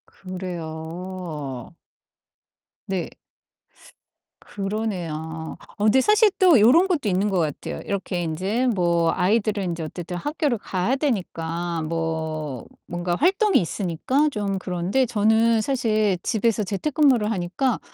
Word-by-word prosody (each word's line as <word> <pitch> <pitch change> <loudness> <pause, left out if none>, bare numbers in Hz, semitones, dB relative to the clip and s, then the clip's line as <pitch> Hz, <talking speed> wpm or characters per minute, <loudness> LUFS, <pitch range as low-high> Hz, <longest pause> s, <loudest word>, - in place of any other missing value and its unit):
그래요. 170 -5 -6 1.1
네. 190 -3 -2 1.3
그러네요. 170 -6 -4 0.2
어 205 - -2
근데 220 +5 +5
사실 425 - +5
또 355 - +7
요런 280 - +6
것도 325 - 0
있는 195 +2 +1
것 190 -2 +1
같아요. 155 -4 -3
이렇게 185 -3 -2
인제 190 +10 -1
뭐 170 -3 +2
아이들은 200 0 +1
이제 165 -1 -4
어쨌든 175 +3 -6
학교를 290 - -1
가야 190 +5 -1
되니까 175 - -2
뭐 160 -4 -3 0.2
뭔가 175 0 -2
활동이 385 - +3
있으니까 200 - 0
좀 205 -6 -2
그런데 185 +8 0
저는 220 0 +3
사실 215 -6 +1
집에서 225 -2 +1
재택근무를 250 - +2
하니까 215 +6 -1
190 Hz, 255 characters per minute, -23 LUFS, 170-230 Hz, 1.3 s, 또